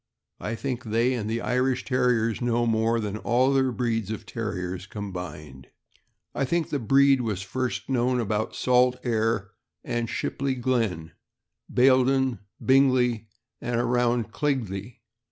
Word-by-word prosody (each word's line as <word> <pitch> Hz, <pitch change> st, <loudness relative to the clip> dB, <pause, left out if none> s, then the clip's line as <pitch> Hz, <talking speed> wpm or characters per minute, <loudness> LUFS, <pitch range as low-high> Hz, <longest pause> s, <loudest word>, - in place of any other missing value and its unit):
I 115 Hz, -, -3 dB
think 130 Hz, +1 st, -4 dB
they 115 Hz, +4 st, +1 dB
and 110 Hz, -4 st, -3 dB
the 115 Hz, +1 st, -1 dB
Irish 125 Hz, 0 st, 0 dB
Terriers 120 Hz, -3 st, +1 dB
know 120 Hz, 0 st, +1 dB
more 115 Hz, 0 st, +2 dB
than 105 Hz, -1 st, -3 dB
all 125 Hz, +4 st, +2 dB
the 135 Hz, -, +4 dB
other 130 Hz, -1 st, +1 dB
breeds 115 Hz, -4 st, -1 dB
of 110 Hz, -, -5 dB
Terriers 90 Hz, -4 st, -4 dB
combined. 90 Hz, -, -7 dB, 0.7 s
I -, -, -1 dB
think 165 Hz, +4 st, 0 dB
the 145 Hz, -, 0 dB
breed 135 Hz, +3 st, +4 dB
was 105 Hz, -5 st, -2 dB
first 130 Hz, +5 st, -3 dB
known 125 Hz, -1 st, +1 dB
about 110 Hz, -1 st, -1 dB
Salt 125 Hz, 0 st, +3 dB
Aire 110 Hz, -4 st, 0 dB, 0.3 s
and 120 Hz, -1 st, -2 dB
Shipley 135 Hz, -1 st, -2 dB
Glen, 115 Hz, -10 st, -1 dB, 0.6 s
Bayl 130 Hz, +1 st, +5 dB
don, 130 Hz, -4 st, +1 dB, 0.3 s
Bingley, 130 Hz, -4 st, +3 dB, 0.3 s
and 120 Hz, -1 st, -1 dB
around 120 Hz, -1 st, +1 dB
Keighley. 115 Hz, -5 st, -3 dB
120 Hz, 140 wpm, -26 LUFS, 110-130 Hz, 0.7 s, Bayl